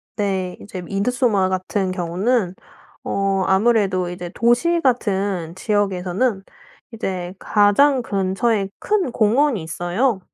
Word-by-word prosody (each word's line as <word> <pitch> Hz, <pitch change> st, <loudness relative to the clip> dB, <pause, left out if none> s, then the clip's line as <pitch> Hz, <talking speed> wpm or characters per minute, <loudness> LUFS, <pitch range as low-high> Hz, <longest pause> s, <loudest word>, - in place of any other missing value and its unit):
네. 190 Hz, -3 st, -2 dB
이제 190 Hz, -3 st, -8 dB
미드소마 200 Hz, +1 st, +1 dB
같은 185 Hz, +1 st, -1 dB
경우는 185 Hz, +3 st, 0 dB, 0.5 s
어 195 Hz, -1 st, 0 dB
아무래도 190 Hz, -3 st, +2 dB
이제 175 Hz, 0 st, -6 dB
도시 285 Hz, +9 st, +2 dB
같은 195 Hz, -, 0 dB
지역에서는 195 Hz, +1 st, 0 dB, 0.5 s
이제 185 Hz, -4 st, -4 dB
가장 250 Hz, +7 st, +3 dB
근처에 195 Hz, 0 st, 0 dB
큰 395 Hz, -10 st, 0 dB
공원이 235 Hz, -, +2 dB
있어요. 180 Hz, +8 st, -1 dB
200 Hz, 245 characters per minute, -21 LUFS, 185-235 Hz, 0.5 s, 가장